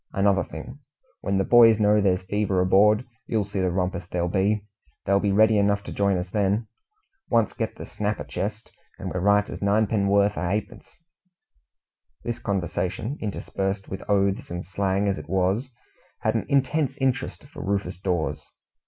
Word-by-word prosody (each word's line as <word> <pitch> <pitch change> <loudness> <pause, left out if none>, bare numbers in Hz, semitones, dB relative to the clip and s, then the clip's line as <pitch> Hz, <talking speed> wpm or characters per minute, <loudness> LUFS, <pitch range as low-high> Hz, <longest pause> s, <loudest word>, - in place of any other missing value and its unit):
Another 100 0 +3
thing, - - -9 0.4
when 100 0 -1
the 95 - +2
boys 115 0 +6
know 105 0 +4
there's 95 -1 +1
fever 100 0 0
aboard, 105 +5 +4 0.2
you'll 110 -3 0
see 100 0 -4
the 95 -1 +1
rumpus 90 -1 -2
there'll 90 -1 -1
be. 100 +3 +1 0.4
They'll 100 0 +3
be 100 0 +1
ready 110 +1 +5
enough 100 0 +2
to - - -8
join 100 -2 +1
us 90 +1 -5
then. 105 +1 +1 0.6
Once 115 -3 +2
get - - -3
the - - -8
snapper 105 -6 -3
chest, 105 +9 -5 0.3
and - - -5
we're 90 - -2
right 100 +2 +3
as - - -7
ninepenn'orth 100 -1 +2
o' 90 - -1
hapence." 105 +3 -4 1.3
This 120 0 -3
conversation, 100 - -2
interspersed 95 -1 -3
with 95 - -5
oaths 100 +3 +1
and 90 +1 -5
slang 95 +2 0
as 100 - 0
it - - -11
was, 95 +7 0 0.5
had 110 - +1
an 115 - -2
intense 140 0 +1
interest 135 -1 -1
for 140 - -10
Rufus 100 -2 -2
Dawes. 90 -4 -1
100 Hz, 165 wpm, -25 LUFS, 95-110 Hz, 1.3 s, boys